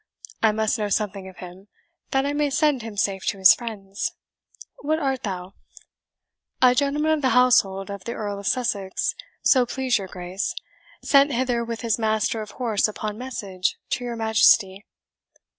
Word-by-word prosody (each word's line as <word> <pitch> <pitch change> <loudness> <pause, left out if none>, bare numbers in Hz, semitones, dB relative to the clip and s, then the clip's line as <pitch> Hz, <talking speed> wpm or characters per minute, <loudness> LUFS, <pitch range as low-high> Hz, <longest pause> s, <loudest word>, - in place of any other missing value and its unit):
I 220 - +4
must 220 +1 0
know 210 -1 -1
something 195 -2 -2
of 185 - -16
him, 185 +2 -11 0.4
that 270 0 +1
I 285 - -1
may 295 0 +1
send 290 -2 +2
him 220 -2 -8
safe 195 -1 0
to - - 0
his 190 -1 +8
friends. 215 -2 -5 0.7
What 310 +2 0
art 270 -5 -1
thou?" 185 -2 -5 1.1
"A 250 -1 +6
gentleman 290 +3 +1
of 310 -1 +1
the 260 - +2
household 200 -6 +3
of 200 -2 -8
the 235 - -3
Earl 205 -3 -4
of 200 - -6
Sussex, 205 -7 -1 0.3
so 255 -2 +5
please 255 -2 0
your 195 - -6
Grace, 180 +2 -4 0.5
sent 280 0 +4
hither 245 -1 0
with 230 -1 -5
his 230 -1 0
master 220 0 0
of 210 - -7
horse 225 -5 +1
upon 215 0 -5
message 200 -8 -3
to 250 - -1
your 240 -1 -4
Majesty." 220 -3 +3
220 Hz, 170 wpm, -24 LUFS, 200-255 Hz, 1.1 s, his